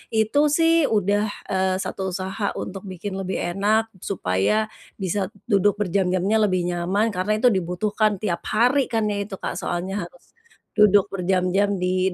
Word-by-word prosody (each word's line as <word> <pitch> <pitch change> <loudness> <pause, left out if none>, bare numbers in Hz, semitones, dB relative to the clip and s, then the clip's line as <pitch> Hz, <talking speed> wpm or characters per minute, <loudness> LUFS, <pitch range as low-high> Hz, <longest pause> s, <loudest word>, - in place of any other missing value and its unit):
itu 220 +6 +2 0.2
sih 330 0 +4 0.2
udah, 205 +1 +1 0.3
eee, 190 0 +1
1 - - -5
usaha 190 +3 -3 0.2
untuk 190 0 -7
bikin 185 +2 -6
lebih 190 0 -3 0.2
enak 210 +3 +3 0.3
supaya 135 - +1 0.4
bisa 185 +2 -1 0.3
duduk 200 0 +4
berjam-jamnya 190 +1 +1
lebih 185 -3 +1
nyaman 180 +5 0
karena 185 +3 -1
itu 250 - +4
dibutuhkan 205 +5 0
tiap 175 -5 -1
hari 250 +6 +3
kan 225 -2 +1
ya 205 - -2
itu 200 -1 -7
Kak - - -2
soalnya 185 +3 -3
harus, - - -13 0.5
duduk 205 -2 +5
berjam-jam 185 +1 +1
di 185 +1 +1
195 Hz, 150 wpm, -23 LUFS, 185-210 Hz, 0.5 s, duduk